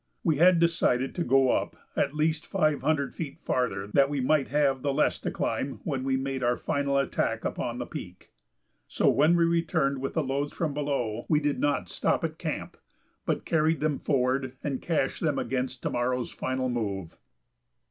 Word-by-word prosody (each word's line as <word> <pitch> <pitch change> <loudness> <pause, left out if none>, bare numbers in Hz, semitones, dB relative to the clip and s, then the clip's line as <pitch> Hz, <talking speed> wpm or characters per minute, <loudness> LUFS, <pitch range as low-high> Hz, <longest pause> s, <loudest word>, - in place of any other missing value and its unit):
We 160 -4 +2
had 175 +3 +6
decided 150 -6 +2
to 175 - -1
go 135 -2 +4
up - - -1 0.2
at 140 - 0
least 155 +1 0
five 155 -6 +1
hundred 140 -4 0
feet 145 -4 -6
farther 100 -7 -1
that 140 0 +5
we 145 -1 -1
might 135 +2 +2
have 140 -2 +1
the 140 - 0
less 135 - +1
to - - -3
climb 135 0 -2
when 135 -4 -2
we 135 0 +1
made 135 0 -3
our 120 0 +2
final 140 -1 0
attack 140 -1 0
upon - - -2
the - - -3
peak. - - -9 0.6
So - - +2
when 155 +5 +4
we 170 - +4
returned 165 -5 +1
with 135 - -3
the 160 - +2
loads 140 +2 -2
from 160 -4 -2
below 135 -6 -2
we 150 - +4
did 145 -1 -1
not 140 -12 0
stop - - 0
at - - -3
camp, - - -4 0.5
but - - -1
carried 160 0 +2
them 150 -2 0
forward 130 -1 0
and 140 -3 -2
cached 160 -5 -1
them 150 -4 +1
against 130 -1 -2
to - - -1
morrow's 125 0 -1
final 130 0 -2
move. 100 -8 -3
140 Hz, 190 wpm, -28 LUFS, 130-155 Hz, 0.6 s, had